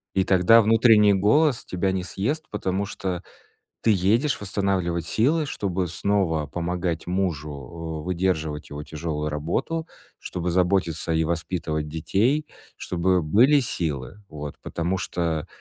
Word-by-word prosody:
И 95 - +3
тогда 95 +5 +6
внутренний 110 -1 +5
голос 125 +8 +3
тебя 95 +1 -1
не 95 -1 -2
съест, 140 - -2
потому 100 -1 -1
что 95 -3 -4 0.6
ты 115 - +3
едешь 110 +9 +2
восстанавливать 95 -4 -1
силы, 150 - +2
чтобы 95 -9 -2
снова 85 -3 0
помогать 85 +1 -3
мужу, 90 -5 -1 0.5
э, - - -11
выдерживать 85 -4 -1
его 75 +1 -6
тяжёлую 75 0 -3
работу, 85 - -2 0.3
чтобы 90 0 -4
заботиться 90 -2 +1
и 80 0 +2
воспитывать 80 -2 -2
детей, 110 - +1 0.3
чтобы 90 +1 0
были 120 - +5
силы, 80 - -3
вот, 75 -1 -7
потому 85 +3 -2
что, 85 -4 -2
90 Hz, 125 wpm, -24 LUFS, 80-105 Hz, 0.6 s, тогда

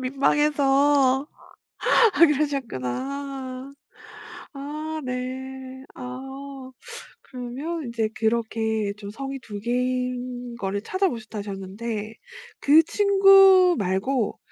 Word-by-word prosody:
민망해서. 275 0 +2 0.9
아 - - -2
그러셨구나. 275 - -1 0.8
아. 285 +2 -6 0.3
네. 260 +1 -6
아. 265 +1 -8 0.5
그러면 270 +6 -5
인제 230 -2 -1
그렇게 220 -2 -1
좀 200 -1 -8
성이 270 +5 -6
2 210 -5 -8
개인 250 0 -2
거를 200 -2 -3
찾아보셨다 230 - -2
하셨는데 205 +2 -5 0.5
그 310 +3 +6
친구 390 -1 +6
말고 205 +5 -1
255 Hz, 175 characters per minute, -24 LUFS, 230-280 Hz, 0.9 s, 그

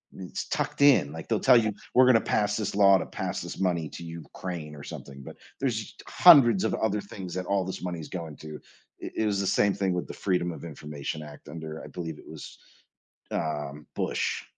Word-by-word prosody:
It's 95 -2 -6
tucked - - -2
in 130 - +6
like 80 +1 -8
they'll 110 -2 +1
tell 130 -2 +6
you 110 -2 0 0.2
we're 130 - +7
going 130 - +6
to 115 - +5
pass 105 0 +1
this 105 -3 -2
law 100 -1 +7
to 85 - -3
pass - - -4
this - - -7
money 85 -5 0
to 85 - -9
Ukraine 85 -1 -7
or 70 - -10
something, 70 -1 -9
but - - -10 0.2
there's 125 -5 0
us - - -11
hundreds 130 - +7
of 110 - 0
other 105 -1 0
things 95 -2 -8
that 90 -1 -4
all 100 -2 +1
this 95 - -5
money 90 -2 -4
is 80 - -7
going 80 -5 -6
to, 75 -1 -9 0.4
i - - -4
it 110 - +1
was 100 -2 +1
the 100 - -1
same 100 +1 +3
thing 95 -2 0
with 90 - -3
the - - -7
Freedom 90 -3 0
of - - -10
Information 75 -2 -6
Act 75 -1 -11
under, 80 -1 -7
I - - -8
believe 80 -4 -6
it - - -15
was, 80 -2 -10 0.7
um, 75 -1 -3
Bush, - - -1
90 Hz, 220 wpm, -27 LUFS, 80-105 Hz, 0.7 s, we're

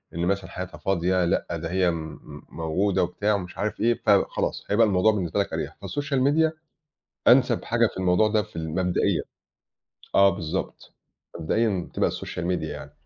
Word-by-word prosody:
إن 85 +1 -1
مثلًا 100 +1 -1
حياتها 90 0 -7
فاضية 90 -1 +1
لأ 85 - 0
ده 85 0 -4
هي 95 0 +2
آمم، 80 -2 -5
موجودة 90 +5 0
وبتاع 100 +4 0
ومش 90 -2 -6
عارف 105 +1 -2
إيه 120 +1 +3
فخلاص 100 -2 +1
هيبقى 110 +2 +4
الموضوع 100 +2 +3
بالنسبة 95 -2 -2
لَك 100 - -1
أريّح، - - -4
فالsocial 145 -2 -2
media 160 +2 +3 0.8
أنسَب 125 -1 +4
حاجة 115 0 +2
في - - -7
الموضوع 90 +3 +3
ده 105 0 +2
في - - -14
المبدئِيَّة 85 +3 0 0.9
آه 100 0 +6
بالضبط 85 -4 -5 0.5
مبدئيًا 95 +2 0
تبقى - - +1
الsocial 85 - -6
media 90 -2 -1
يعني. 80 - -7
95 Hz, 160 wpm, -25 LUFS, 85-110 Hz, 0.9 s, آه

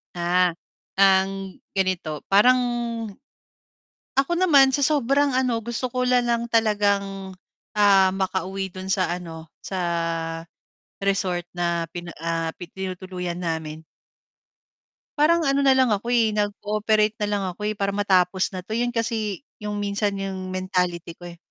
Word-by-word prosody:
Ah, 175 +1 +2 0.5
ang 195 0 +3 0.2
ganito, 185 -6 -1
parang 250 +6 +5 1.6
ako 275 +4 +2
naman 280 -7 +6
sa 285 - 0
sobrang 280 -1 +2
ano 250 -3 +1
gusto 240 +2 -4
ko 250 0 0
nalang 240 -1 +2
talagang, 200 -4 0 0.4
ah, 200 -2 +6
makauwi 190 0 -2
do'n 185 +1 -8
sa 185 -2 +1
ano 165 -3 -7
sa 190 - -6 1.2
resort 185 -3 -1
na 170 -1 -1
pina 175 0 -7
ah, 165 -1 -2
pi 175 -2 -10
tinutuluyan 185 -2 -5
namin. 160 -2 -4 1.3
Parang 330 +2 +4
ano 275 -1 +2
na 270 -1 +5
lang 260 -3 +3
ako, 210 +3 -1
eh, 230 -3 +3
nag-cooperate 210 +1 0
na 210 - 0
lang 205 -1 -1
ako, 180 - -15
eh, 215 - -2
para 200 -1 -1
matapos 190 -2 +2
na 180 - -5
'to 215 - -13
'yon 240 +2 0
kasi 225 -1 -2 0.2
'yong 210 0 -4
minsan 205 0 -1
'yong 190 -1 -4
mentality 180 -2 -1
ko, 175 - -9
eh, 170 0 -11
195 Hz, 135 wpm, -24 LUFS, 180-230 Hz, 1.6 s, naman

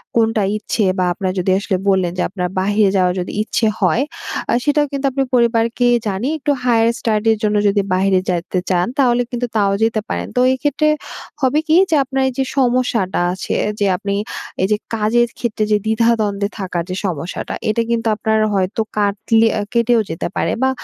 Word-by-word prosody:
কোনটা 225 -2 +2
ইচ্ছে। 215 +1 -2
বা, 185 - +1
আপনার 185 +1 -2
যদি 185 +1 +1
আসলে 195 -1 -1
বললেন 190 -3 +2
যে, - - 0
আপনার 180 -1 -3
বাহিরে 205 +1 +2
যাওয়ার 180 -1 +2
যদি 180 - -4
ইচ্ছে 220 +1 0
হয়, 240 - +2 0.5
আ - - +2
সেটাও 295 0 +2
কিন্তু 280 0 -3
আপনি 270 +1 0
পরিবারকে 235 0 +2 0.2
জানিয়ে 210 +9 -1
একটু 290 +1 0
higher 230 -2 +3
study 220 -1 +1
র - - -3
জন্য 210 0 +1
যদি 200 0 +2
বাহিরে 190 0 +2
যাইতে 180 +1 -1
চান, 180 -1 +2
তাহলে 245 -3 +3
কিন্তু 245 0 -2
তাও 200 -2 +2
যেতে 225 -1 +1
পারেন। - - -3
তো - - +2
এইক্ষেত্রে 290 +3 0 0.5
হবে 270 +3 +2
কি? 315 - +4
যে 325 - +3
আপনার 270 0 -2
এইযে 265 +1 -2
সমস্যাটা 245 -6 +1
আছে, 185 - -4 0.3
যে 205 - +2
আপনি 200 +1 -3 0.5
এইযে 210 +2 +2 0.2
কাজের 230 +2 +2
ক্ষেত্রে 220 -3 -1
যে 210 - +5
দ্বিধা-দ্বন্দ্বে 220 -3 +1
থাকার 180 -3 -2
যে 185 - -3
সমস্যাটা, 170 -2 -4 0.2
এটা 215 +2 +1
কিন্তু 230 -1 0
আপনার 220 +1 0
হয়তো 195 +3 0 0.2
কাটলে 210 +2 +2
এ - - -1
কেটেও 235 -1 +3
যেতে 160 - -3
পারে। - - 0
বা, 265 - +4
220 Hz, 180 wpm, -18 LUFS, 195-240 Hz, 0.5 s, যে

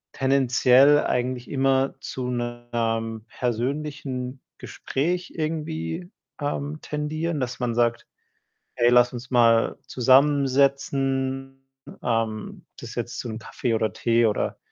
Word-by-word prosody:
tendenziell 135 +1 +4
eigentlich 125 0 -2
immer 135 -1 +1
zu 125 -1 -5
'nem 120 -2 -3
persönlichen 130 +1 -3 0.2
Gespräch 175 +6 -3
irgendwie, 155 - -3 0.3
ähm, 145 +1 -3
tendieren, 155 +2 -3
dass 125 -1 -3
man 120 -2 -1
sagt: 120 0 +1 0.7
„Hey, 120 -1 +4
lass 125 0 +5
uns 125 +1 -8
mal 115 -2 +4
zusammensetzen.“ 135 0 +2 0.4
Ähm, 115 -2 -2
ob - - -56
das 115 0 -9
jetzt 120 0 -4
zum 110 -3 -5
Kaffee 120 0 -3
oder 110 0 0
Tee 115 0 +2
oder 105 -2 0
125 Hz, 110 wpm, -24 LUFS, 120-140 Hz, 0.7 s, lass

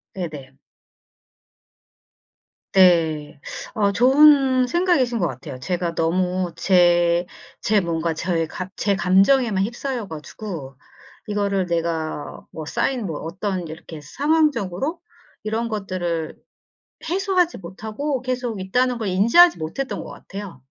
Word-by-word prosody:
네네. 150 -8 -6 2.2
네. 165 -6 +3 0.4
아 205 -2 +2
좋은 265 +2 +5
생각이신 260 - +1
것 175 - +1
같아요. 130 -1 -8
제가 175 +4 -2
너무 180 +2 0
제, 175 -1 +3 0.3
제 215 -1 +3
뭔가 165 -1 -1
저의 165 -1 -1
가 185 +3 -6
제 200 -1 +1
감정에만 195 +4 +3
휩싸여 240 0 -4
가지고 155 -3 -8 0.5
이거를 200 -3 0
내가 165 -3 -3
뭐 155 - -7
쌓인 245 - -1
뭐 160 -5 -4
어떤 185 +1 -4
이렇게 160 0 -9
상황적으로 290 - 0 0.4
이런 225 +2 -2
것들을 180 -6 -3 0.8
해소하지 370 -2 +1
못하고 220 - -4
계속 245 -5 -3
있다는 250 +6 +1
걸 220 -4 -3
인지하지 230 - +5
못했던 170 +13 -4
것 - - -9
같아요. 195 -10 -9
190 Hz, 245 characters per minute, -22 LUFS, 170-245 Hz, 2.2 s, 좋은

